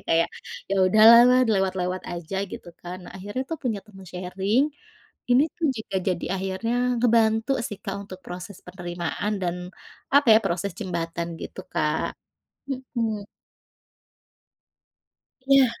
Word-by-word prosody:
Kayak, 165 +1 +3 0.4
ya - - +2
udahlah 220 +4 +9 0.2
lewat-lewat 190 -4 0
aja, 175 +2 -5
gitu 175 - -9
kan. 180 +1 -6
Nah, - - -10
akhirnya 205 +7 -4
tuh 325 - -3
punya 220 -6 -2
teman 195 -3 -14
sharing. 195 - 0 0.6
Ini 250 +3 +6
tuh 330 - 0
juga 215 -3 -4
jadi 180 -2 -1
akhirnya 195 +5 -2 0.3
ngebantu 225 +1 +3
sih, 205 - -5
Kak, 195 0 -3
untuk 190 -2 -10
proses 180 +2 -8
penerimaan 175 +2 -3
dan, 175 0 -1 0.6
apa 285 0 +6
ya, - - +8
proses 180 +3 -1
jembatan 170 -3 -3
gitu, - - -7
Kak. - - 0 0.6
Mhm. 235 -5 -3 2.2
Ya. 275 -1 +6
195 Hz, 125 wpm, -25 LUFS, 180-230 Hz, 2.2 s, udahlah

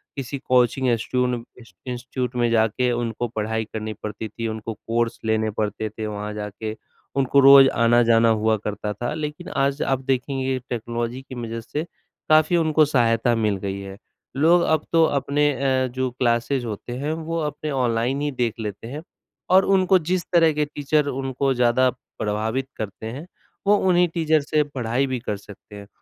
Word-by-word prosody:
किसी 140 0 -4
कोचिंग 130 0 +2
इंस्टीट्यून 125 +1 0 0.3
इंस 115 -6 -16
इंस्टीट्यूट 125 0 -4
में 120 -1 +2
जाके 115 +2 +2
उनको 120 0 -2
पढ़ाई 110 0 -2
करनी 110 0 -4
पड़ती 110 +1 -5
थी, 115 +1 -5
उनको 110 0 -5
कोर्स 115 +2 -2
लेने 110 0 +1
पड़ते 105 +1 -2
थे 110 +1 -6
वहाँ 105 0 -5
जाके 105 +1 -5 0.4
उनको 135 0 +3
रोज़ 135 0 +9
आना-जाना 115 -1 +4
हुआ 110 0 +2
करता 105 0 -4
था। 120 +6 -3
लेकिन 150 -1 -5
आज 140 +1 0
आप 135 -1 0
देखेंगे 130 0 -1
टेक्नोलॉजी 120 +1 -3
की 130 -1 -10
वजह 115 0 -5
से 150 +7 -4 0.5
काफ़ी 155 +2 +5
उनको 155 -2 +3
सहायता 120 -4 +2
मिल 105 -3 0
गई 95 0 -4
है। 95 0 -8 0.4
लोग 170 +5 +5
अब 160 -2 +1
तो 165 -1 +5
अपने 145 0 +1
अ, 130 0 +1
जो 130 +1 -2
क्लासेस 120 +1 0
होते 115 +2 -6
हैं, 145 +3 -2
वो 165 +1 -3
अपने 150 0 -3
ऑनलाइन 125 +1 0
ही 145 0 -1
देख 120 -4 -1
लेते 105 0 -5
हैं 145 +5 -6 0.5
और 190 +1 +6
उनको 190 -1 +4
जिस 175 +2 -1
तरह 165 -2 +5
के 150 0 0
टीचर 145 0 0
उनको 135 0 -1
ज़्यादा 125 +1 +3 0.3
प्रभावित 110 +5 -1
करते 105 +1 -6
हैं, 135 +9 -6 0.4
वो 205 - +6
उन्हीं 180 -2 +3
टीचर 160 -2 +2
से 150 +1 +1
पढ़ाई 130 -2 -1
भी 130 -1 -2
कर 105 -3 -4
सकते 105 +1 -14
हैं। 100 0 -10
125 Hz, 175 wpm, -23 LUFS, 110-140 Hz, 0.5 s, रोज़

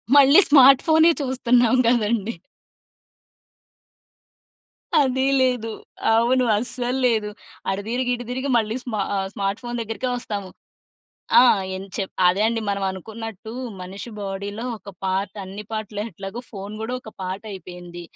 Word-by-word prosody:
మళ్ళి 280 +5 +8
స్మార్ట్ 275 -2 +8
ఫోనే 320 +1 +6
చూస్తున్నాం 250 -2 +3
గదండీ. 230 -2 +1 2.7
అదీ 265 -1 +1 0.2
లేదు. 245 -3 +1 0.4
అవును. 245 +3 +3
అస్సల్లేదు. 240 -1 0 0.4
అటు 195 +1 -1
తిరిగి 250 +1 0
ఇటు 245 0 -8
తిరిగి 260 +2 -2
మళ్ళీ 220 -1 0
స్మా 215 -5 -2 0.2
ఆహ్, 190 - -1
స్మార్ట్ 195 +1 -2
ఫోన్ 240 0 -4
దగ్గరికే 225 +3 -4
ఒస్తాము. 200 -5 -5 0.9
ఆ! - - +8 0.3
ఏం 190 - -5
చెప్ 195 -2 -3 0.2
అదే 180 +3 +3
అండి. 225 0 0
మనం 200 0 -1
అనుకున్నట్టు 220 +3 -7 0.3
మనిషి 195 +6 -8
బాడీలో 200 +2 -5
ఒక 205 0 -15 0.2
పార్ట్, 190 +1 -1
అన్ని 195 +2 -8
పార్ట్‌లు 215 -2 -4
ఎట్లాగో 200 +3 -7
ఫోన్ 200 -1 -7
గూడా 225 +3 -4
ఒక 220 - -11
పార్ట్ 185 +3 -4
అయిపోయింది. 175 -2 -9
220 Hz, 130 wpm, -23 LUFS, 195-245 Hz, 2.7 s, మళ్ళి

